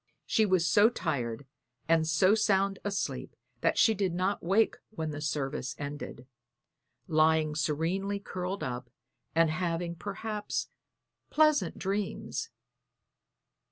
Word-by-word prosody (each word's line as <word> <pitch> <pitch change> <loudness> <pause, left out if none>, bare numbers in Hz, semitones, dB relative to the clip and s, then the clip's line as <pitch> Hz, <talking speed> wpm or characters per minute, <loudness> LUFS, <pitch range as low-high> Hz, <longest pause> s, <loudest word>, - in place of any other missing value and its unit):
She 220 -1 +3
was 185 -3 +3
so 205 +7 +6
tired 140 - -3 0.4
and 160 -1 +3
so 165 +5 +4
sound 195 -3 +2
asleep 135 -10 -3 0.2
that - - +1
she 220 - +5
did 190 -4 -1
not 185 +3 0
wake 195 +6 +2
when 160 -8 -4
the 145 0 -6
service 135 -3 -2
ended, 145 -3 -6 0.8
lying 155 -1 +3
serenely 165 +7 -1
curled 185 0 -4
up, 125 0 -4 0.5
and 165 -1 +4
having 170 0 -1
perhaps 210 +3 -4 0.6
pleasant 300 - +3
dreams. 200 +1 -3
175 Hz, 115 wpm, -30 LUFS, 150-200 Hz, 0.8 s, so